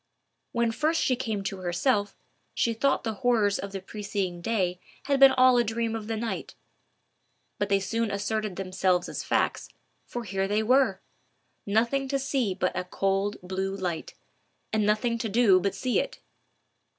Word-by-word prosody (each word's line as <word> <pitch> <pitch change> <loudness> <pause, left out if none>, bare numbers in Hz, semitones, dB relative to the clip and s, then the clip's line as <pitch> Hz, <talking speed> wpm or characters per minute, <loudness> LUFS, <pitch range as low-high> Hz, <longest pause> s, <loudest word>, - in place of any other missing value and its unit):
When 235 -1 +1
first 310 +7 +1
she 255 - +2
came 220 -5 -3
to 195 0 -3
herself, 200 +4 0 0.4
she 230 - +1
thought 270 +5 +1
the 225 - -2
horrors 220 -5 +2
of 200 - -5
the 195 - -4
preceding 195 -3 -4
day 180 -4 0 0.2
had 280 -1 +1
been 270 0 +9
all 255 -1 +5
a - - +4
dream 225 0 -2
of 215 -2 -5
the 225 -1 -2
night. 225 +1 -4 1.0
But 205 - 0
they 195 0 +3
soon 225 +3 -1
asserted 205 0 -2
themselves 185 -1 0
as - - -5
facts, - - 0 0.4
for 240 - -5
here 195 -2 -1
they 210 +2 +1
were!—nothing 235 +1 -1
to 275 +1 0
see 265 -7 -1
but 185 -1 -1
a 185 - -1
cold 195 +2 0
blue 190 +1 -3
light, 180 -4 -4 0.6
and 215 -1 +2
nothing 230 +2 +1
to 225 - -2
do 205 -3 +5
but 195 +1 -1
see 250 +5 +1
it. - - -3
215 Hz, 165 wpm, -27 LUFS, 195-235 Hz, 1.0 s, been